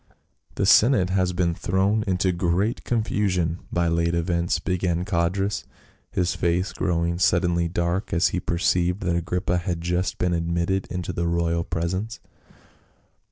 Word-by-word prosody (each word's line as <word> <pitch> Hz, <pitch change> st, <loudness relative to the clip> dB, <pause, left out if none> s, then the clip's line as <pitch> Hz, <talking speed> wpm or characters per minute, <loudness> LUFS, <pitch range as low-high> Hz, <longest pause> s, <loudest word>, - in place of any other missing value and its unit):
" -, -, -35 dB
The -, -, 0 dB
senate 105 Hz, -6 st, +5 dB
has 95 Hz, -1 st, +1 dB
been 85 Hz, -1 st, 0 dB
thrown 95 Hz, +5 st, +1 dB
into 95 Hz, 0 st, +1 dB
great 90 Hz, +5 st, 0 dB
confusion 95 Hz, -7 st, 0 dB
by 85 Hz, 0 st, +1 dB
late 85 Hz, +1 st, +1 dB
events," 85 Hz, 0 st, 0 dB
began 90 Hz, -1 st, -1 dB
Codrus, 95 Hz, +3 st, 0 dB, 0.5 s
his 90 Hz, -1 st, 0 dB
face 85 Hz, +3 st, 0 dB
growing 85 Hz, -1 st, -1 dB
sud 85 Hz, -1 st, +3 dB
denly 85 Hz, -1 st, 0 dB
dark 85 Hz, +3 st, -1 dB
as 85 Hz, +2 st, +3 dB
he 90 Hz, -, -2 dB
perceived 90 Hz, +2 st, 0 dB
that 85 Hz, -1 st, 0 dB
Agrippa 90 Hz, +1 st, -1 dB
had 85 Hz, -1 st, -3 dB
just 90 Hz, +2 st, -1 dB
been 90 Hz, -1 st, 0 dB
admitted 85 Hz, +3 st, -1 dB
into 90 Hz, -1 st, -4 dB
the 85 Hz, 0 st, -1 dB
royal 85 Hz, 0 st, 0 dB
presence. 95 Hz, +7 st, -3 dB
90 Hz, 150 wpm, -24 LUFS, 85-95 Hz, 0.5 s, senate